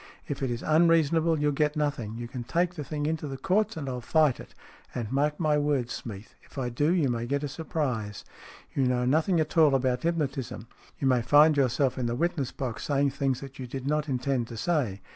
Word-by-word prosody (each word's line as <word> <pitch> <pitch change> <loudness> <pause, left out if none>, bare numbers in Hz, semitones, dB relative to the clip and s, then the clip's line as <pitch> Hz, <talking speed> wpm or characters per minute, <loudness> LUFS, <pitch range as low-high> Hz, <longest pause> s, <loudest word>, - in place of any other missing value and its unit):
If 140 - -4
it 135 - 0
is 120 -1 -3
unreasonable, 165 0 +3
you'll 150 0 +2
get 150 +2 +1
nothing. 145 -8 -2
You 120 0 -5
can 125 0 -6
take 175 +8 0
the 155 -4 -5
thing 145 +1 -3
into 155 -1 -2
the 135 -1 -5
Courts, 195 +6 +1
and 145 -3 -4
I'll 125 -1 -3
fight 150 +1 +2
it. - - -12 0.4
And, 115 -3 -3
mark 150 +2 +1
my 150 -3 +2
words, 145 -5 0
Smeath. 105 -2 -8
If - - -19
I 125 -2 -1
do, 145 +7 +1
you 170 -6 +2
may 120 -1 -2
get 140 +3 -1
a - - -1
surprise. 135 - -3 0.5
You 135 - +1
know 125 -1 +1
nothing 160 +6 +2
at 155 +2 0
all 150 -4 +6
about 125 -1 +1
hypnotism. 140 -9 -2 0.3
You 135 - 0
may 125 -2 +3
find 150 +6 +6
yourself 135 -1 +1
in 120 - -1
the 120 - -1
witness 155 -2 -1
box 125 -5 -5
saying 140 -1 +2
things 135 -2 -1
that 135 -1 -10
you 130 - -5
did 130 +1 -6
not 150 +1 0
intend 130 -2 -1
to 115 - -8
say. 120 - -1
140 Hz, 220 wpm, -28 LUFS, 125-155 Hz, 0.5 s, all